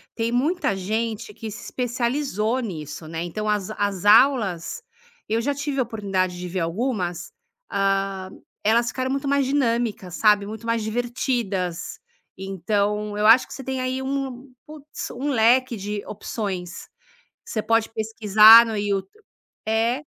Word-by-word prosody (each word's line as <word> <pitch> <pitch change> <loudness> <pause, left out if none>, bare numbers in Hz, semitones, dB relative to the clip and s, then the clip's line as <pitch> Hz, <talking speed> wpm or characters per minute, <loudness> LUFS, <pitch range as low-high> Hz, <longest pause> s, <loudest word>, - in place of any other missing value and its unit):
tem 230 0 -1
muita 290 - +1
gente 215 +3 -3
que 220 +1 -7
se 205 - -9
especializou 245 -2 -1
nisso, 155 - -6
né, 165 +1 -4
então 210 +5 -4
as 210 -2 0
as 205 -3 -2
aulas, 220 - +4 0.5
eu 225 +1 0
já 285 +4 0
tive 285 -1 -2
a - - +3
oportunidade 195 -6 -2
de 180 - -5
ver 180 +1 -3
algumas, 180 - -2 0.4
hã, 195 -1 -1 0.3
elas 230 +3 +3
ficaram 260 +1 -2
muito 275 +1 -2
mais 280 0 +2
dinâmicas, 235 - -1
sabe, 210 -1 +4
muito 220 +2 -8
mais 230 0 0
divertidas. 220 - -2 0.4
Então 205 +2 -2
eu 210 0 +3
acho 230 +3 +7
que - - -11
você 270 - -8
tem 265 -1 -2
aí 255 +1 -2
um 265 -1 -4 0.2
puts, 305 -1 -8
um 275 +4 -3
leque 250 0 +3
de 205 0 -5
opções. 195 -4 -5 0.6
Você 215 - -3
pode 225 +1 +1
pesquisar 220 +1 +7
no 225 -2 -3
You 205 -1 0 0.6
é. 230 +5 +1
220 Hz, 145 wpm, -23 LUFS, 195-250 Hz, 0.6 s, acho